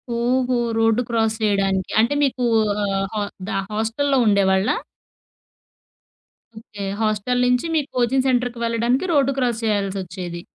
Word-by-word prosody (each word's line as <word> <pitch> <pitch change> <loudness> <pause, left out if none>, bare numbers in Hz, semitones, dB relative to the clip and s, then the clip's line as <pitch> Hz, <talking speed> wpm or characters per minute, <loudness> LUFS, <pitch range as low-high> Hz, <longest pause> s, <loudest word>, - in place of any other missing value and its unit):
ఓహో! 250 +2 +1 0.2
Road 225 +1 +3
cross 225 -2 +1
జేయడానికి. 195 -3 0
అంటే 230 +5 +3
మీకు 260 -2 0 0.4
ఆహ్, 195 -1 -1
హా 210 - 0 0.3
ద - - -4 0.2
హాస్టల్లో 230 +6 0
ఉండేవాళ్ళా? 195 -1 +3 1.8
ఓకే. 205 -2 -8 0.2
హాస్టల్ 220 +3 0
నించి 250 +3 +2
మీ 310 - +3
కోచింగ్ 255 +2 +1
సెంటర్‌కి 245 -2 0
వెళ్ళడానికి 235 +6 0
రోడ్డు 275 -2 +3
క్రాస్ 240 -3 0
చేయాల్సొచ్చేది. 190 -4 -3
225 Hz, 120 wpm, -21 LUFS, 200-250 Hz, 1.8 s, రోడ్డు